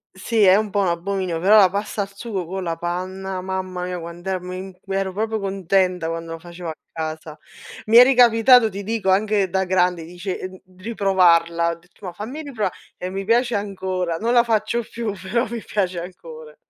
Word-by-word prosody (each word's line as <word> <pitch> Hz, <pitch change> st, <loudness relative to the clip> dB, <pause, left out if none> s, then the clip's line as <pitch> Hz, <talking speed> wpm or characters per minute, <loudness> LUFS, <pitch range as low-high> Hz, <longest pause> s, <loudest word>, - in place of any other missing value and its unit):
sì 215 Hz, +3 st, +1 dB
è 190 Hz, 0 st, +7 dB
un 215 Hz, -1 st, -1 dB
po' 200 Hz, 0 st, 0 dB
un 190 Hz, -, +1 dB
abominio, 175 Hz, 0 st, -2 dB
però 205 Hz, +5 st, +5 dB
la 190 Hz, -3 st, +7 dB
pasta 205 Hz, +2 st, -3 dB
al 195 Hz, 0 st, -5 dB
sugo 200 Hz, -4 st, -4 dB
con 190 Hz, +2 st, -5 dB
la 165 Hz, -1 st, -2 dB
panna, 185 Hz, +2 st, -4 dB
mamma 185 Hz, -1 st, -4 dB
mia 180 Hz, -1 st, -4 dB
quant'è 175 Hz, +3 st, -5 dB
mi 180 Hz, +1 st, -6 dB, 0.2 s
mi 195 Hz, 0 st, -3 dB
ero 195 Hz, -1 st, -1 dB
proprio 220 Hz, +2 st, -2 dB
contenta 190 Hz, -3 st, 0 dB
quando 165 Hz, 0 st, -5 dB
lo 165 Hz, -, -7 dB
facevo 175 Hz, 0 st, -8 dB
a -, -, -4 dB, 0.2 s
casa. 160 Hz, -1 st, -6 dB, 0.5 s
Mi 225 Hz, +2 st, +5 dB
è 245 Hz, -, +12 dB
ricapitato, 245 Hz, -2 st, +6 dB
ti 200 Hz, +1 st, -6 dB
dico 215 Hz, -2 st, -1 dB
anche 200 Hz, 0 st, +2 dB
da 190 Hz, +1 st, +1 dB
grande, 180 Hz, -2 st, +1 dB
dice 175 Hz, +3 st, -6 dB
ehm, 185 Hz, 0 st, -8 dB, 0.2 s
riprovarla, 175 Hz, -5 st, +2 dB
ho -, -, -5 dB
detto: 180 Hz, +3 st, -17 dB
"Ma 180 Hz, -, -4 dB
fammi 245 Hz, -, -6 dB
riprova" 220 Hz, -10 st, -2 dB, 0.3 s
e 180 Hz, -, -5 dB
mi 195 Hz, +1 st, -4 dB
piace 235 Hz, +2 st, +2 dB
ancora, 185 Hz, -4 st, -2 dB
non 235 Hz, +5 st, 0 dB
la 240 Hz, -1 st, +6 dB
faccio 225 Hz, +1 st, 0 dB
più, 230 Hz, -3 st, -3 dB
però 230 Hz, +6 st, -1 dB
mi 235 Hz, -2 st, -5 dB
piace 185 Hz, -4 st, -1 dB
ancora. 160 Hz, -3 st, -10 dB
190 Hz, 200 wpm, -22 LUFS, 175-210 Hz, 0.5 s, è